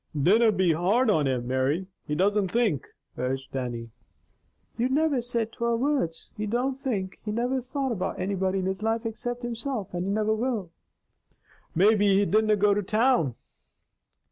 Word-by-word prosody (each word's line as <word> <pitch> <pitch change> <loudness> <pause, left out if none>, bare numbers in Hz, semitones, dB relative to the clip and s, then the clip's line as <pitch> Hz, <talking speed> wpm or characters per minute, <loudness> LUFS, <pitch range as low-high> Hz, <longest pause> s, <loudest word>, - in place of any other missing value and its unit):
"Dinna 215 +9 +5
be 185 -4 +2
hard 210 +9 +2
on 150 -7 +2
him, 125 -2 -1
Mary. 130 +8 0 0.2
He 150 - -1
doesna 200 +3 +2
think," 220 - +1 0.3
urged 135 +1 -3
Dannie. 120 -3 -4 0.8
"You 245 +2 0
niver 290 -1 +2
said 230 -2 -2
twer 235 0 0
words. 245 - -1
He 215 -1 -3
don't 255 +4 -1
think. 200 -9 -3
He 210 - -3
niver 245 +4 0
thought 265 +1 -3
about 195 -6 -2
anybody 190 0 0
in 190 - -1
his 190 +1 -2
life 225 +1 0
except 245 +2 -4
himself, 240 -3 -4
and 175 0 -2
he 195 - -1
niver 215 +1 +1
will." 220 -6 -2 1.0
"Maybe 200 +2 +4
he 200 - +3
didna 215 +1 +3
go 205 0 +3
to 205 - 0
town!" 215 - +2
210 Hz, 165 wpm, -27 LUFS, 180-235 Hz, 1.0 s, Dinna